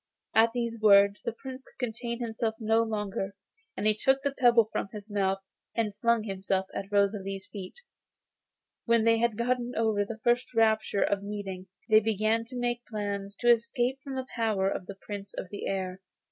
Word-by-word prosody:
At 225 +1 +5
these 235 -2 -2
words 200 -1 +6
the 235 - -2
Prince 260 +3 -9
could - - -22
contain 235 -1 -3
himself 225 -1 -2
no 225 0 +3
longer. 210 -3 -2 0.4
He 215 +1 +3
took 265 +5 +2
the 280 - +1
pebble 240 -5 +5
from - - -2
his 210 0 -9
mouth, 195 -1 +1 0.4
and 220 -3 0
flung 235 -1 +3
himself 195 -2 -1
at 195 +1 -5
Rosalie's 195 -1 0
feet. 200 - -9 1.0
When 230 -1 +4
they 230 0 +4
had 235 -2 +1
got 250 +2 +2 0.2
over 220 -2 +2
the 220 +2 -6
first 245 0 +1
rapture 220 -2 +3
of 200 -1 0
meeting 200 -2 -6 0.2
they 215 -1 +7
began 220 +1 +1
to 250 +2 -7
make 240 0 -1
plans 200 -2 -4
to 240 -1 +6
escape 240 +3 +1
from 270 0 -6
the 260 -1 -3
power 215 -5 +1
of 180 - -4
the 200 - -7
Prince 200 0 -8
of 180 - -5
the 205 - -5
Air. 190 -1 -3
220 Hz, 180 wpm, -29 LUFS, 200-235 Hz, 1.0 s, they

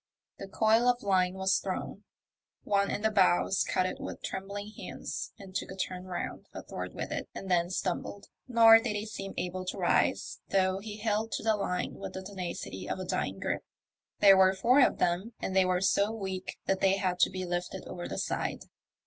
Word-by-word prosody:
The 195 - -6
coil 220 +4 +3
of 245 0 +2
line 185 -2 +2
was 190 0 +2
thrown: 195 +1 -5 0.6
one 200 -1 +2
in 205 - -3
the 220 - +3
bows 190 -1 +3
caught 185 - +2
it 185 - -3
with - - -7
trembling 200 +2 -5
hands - - -6
and 195 -3 -12
took - - -3
a 190 - -7
turn 185 -1 -4
round 185 -1 -5
a - - -6
thwart - - -6
with - - -4
it, - - -4
and 190 - -5
then 175 -1 +3
stumbled, 185 +2 -3 0.2
nor 225 -2 +8
did 225 -2 -2
he 210 +1 -2
seem 195 -2 -6
able 185 +1 -3
to 185 - -4
rise, - - +1
though 190 -1 +2
he 210 +1 -7
held 220 +1 -1
to - - -2
the 220 -1 +3
line 180 -3 -2
with - - -6
the 190 - -6
tenacity 180 - -6
of - - -1
a 185 - -5
dying 95 - -2
grip. - - -2 0.6
There 195 -2 +8
were 190 0 +5
four 240 +8 +4
of 270 - +4
them, 180 +7 0
and 190 - -3
they 190 -1 +5
were 180 0 +1
so 200 +2 +3
weak 190 -4 -5
that 195 - +1
they 195 0 +4
had 185 -2 -1
to - - +5
be 185 -1 -4
lifted 175 +1 -3
over 175 -1 -6
the - - -5
side. - - -2
190 Hz, 210 wpm, -30 LUFS, 185-210 Hz, 0.6 s, nor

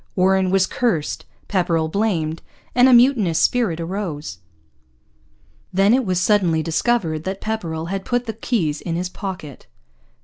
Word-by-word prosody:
Warren 190 0 +3
was 190 0 +3
cursed, 190 -9 -1 0.2
Pepperrell 170 -4 0
blamed; 165 -4 -1 0.3
and 250 +1 +5
a - - +5
mutinous 235 - +4
spirit 220 -10 +1
arose. 165 - -5 1.3
Then 195 +4 +3
it 255 -3 +1
was 185 -1 +1
suddenly 185 -5 +2
discovered 165 -2 0
that 190 +1 -3
Pepperrell 170 -7 -4
had 195 0 -3
put 245 +2 -1
the 225 - -4
keys 185 - -1
in 165 - -3
his 180 +1 -2
pocket. 185 -8 -7
185 Hz, 140 wpm, -21 LUFS, 165-220 Hz, 1.3 s, and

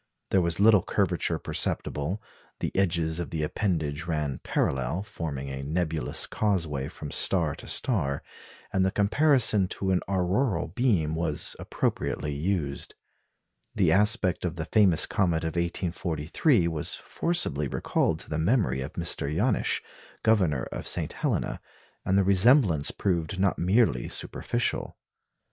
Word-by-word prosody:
There 95 - +4
was 85 0 -1
little 105 -1 +6
curvature - - 0
perceptible; 80 +9 -2 0.4
the - - -3
edges 85 -4 +1
of 85 - -4
the 80 -2 -2
appendage 80 -3 -1
ran 75 -5 -2
parallel, 65 +8 -1
forming 75 -10 -5
a 65 0 -5
nebulous 80 +2 -1
causeway 80 -10 -1
from 75 -2 -8
star - - +2
to - - -10
star; 80 - 0 0.5
and 95 - +2
the 95 - +3
comparison 110 -1 +3
to 95 +1 -2
an 90 - +2
auroral 95 +5 0
beam 100 -12 +1
was 80 -2 -1
appropriately 75 - -2
used. 75 -2 -2 0.8
The - - +3
aspect 105 -3 +2
of 90 -1 -2
the 80 -2 -4
famous 95 -5 +4
comet 85 -4 0
of 80 - 0
1843 85 - 0
was 80 -3 -1
forcibly 75 - -1
recalled 80 +4 0
to - - -11
the 75 - -1
memory 85 - +1
of 65 - -6
Mr. 85 -4 -2
Janisch, 105 +9 +1 0.4
Governor 90 - +2
of - - -5
St. - - -1
Helena; - - -2 0.4
and 95 - +1
the 100 - +4
resemblance 100 - +4
proved 90 -1 -1
not 95 -1 +1
merely 90 - +2
superficial. 120 0 -3
85 Hz, 135 wpm, -27 LUFS, 75-100 Hz, 0.8 s, little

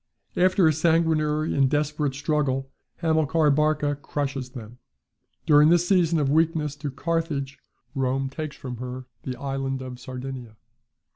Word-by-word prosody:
After 185 -1 +4
a 155 - +4
sanguinary 155 -1 +1
and 135 -1 +3
desperate 150 -1 0
struggle, 140 -2 -1 0.3
Hamilcar 160 -1 +3
Barca 150 0 +1
crushes 140 -2 -4
them. 120 -2 -10 0.7
During 150 -1 +6
this 175 +1 +3
season 175 -4 +3
of 145 -3 +1
weakness 155 -2 +1
to 145 0 -4
Carthage, 140 -2 -2 0.3
Rome 135 0 0
takes 150 +2 -6
from 125 -3 -7
her 125 +1 -6 0.2
the 130 - -5
island 135 0 -3
of 125 -1 -8
Sardinia. 125 -3 -7
145 Hz, 135 wpm, -25 LUFS, 135-155 Hz, 0.7 s, During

